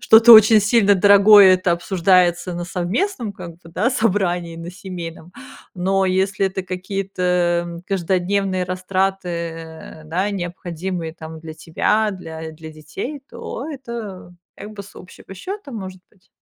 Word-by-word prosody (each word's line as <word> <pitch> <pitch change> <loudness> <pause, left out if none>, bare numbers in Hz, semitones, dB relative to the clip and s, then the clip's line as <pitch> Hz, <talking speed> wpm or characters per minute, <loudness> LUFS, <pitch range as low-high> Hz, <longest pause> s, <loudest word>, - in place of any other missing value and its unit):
что-то 225 +2 +7
очень 215 0 +7
сильно 205 -1 +3
дорогое, 200 0 +7
это 180 -1 0
обсуждается 175 0 +1
на 175 - -4
совместном 215 - -2
как 180 -3 -9
бы, 170 -1 -16
да, 185 +8 0
собрании 180 -7 -1
на 165 +1 -8
семейном, 175 -2 -9 0.4
но 190 +1 0
если 190 +2 0
это 190 0 -4
какие-то, 185 +1 -5 0.4
м, 170 0 -8
каждодневные 190 0 -1
растраты, 175 -4 -4
да, 185 +6 -1
необходимые 175 -2 -5
там 160 -1 -10
для 160 -1 -9
тебя, 210 +7 0
для 160 -3 -8
для 160 0 -11
детей, 155 - -7
то 270 - -7
это 230 - -8 0.2
как 215 - -9
бы 200 - -8
с 200 - -16
общего 190 +1 -13
счёта 375 - -8
может 190 -4 -7
быть. 190 -3 -31
185 Hz, 140 wpm, -20 LUFS, 175-200 Hz, 0.4 s, что-то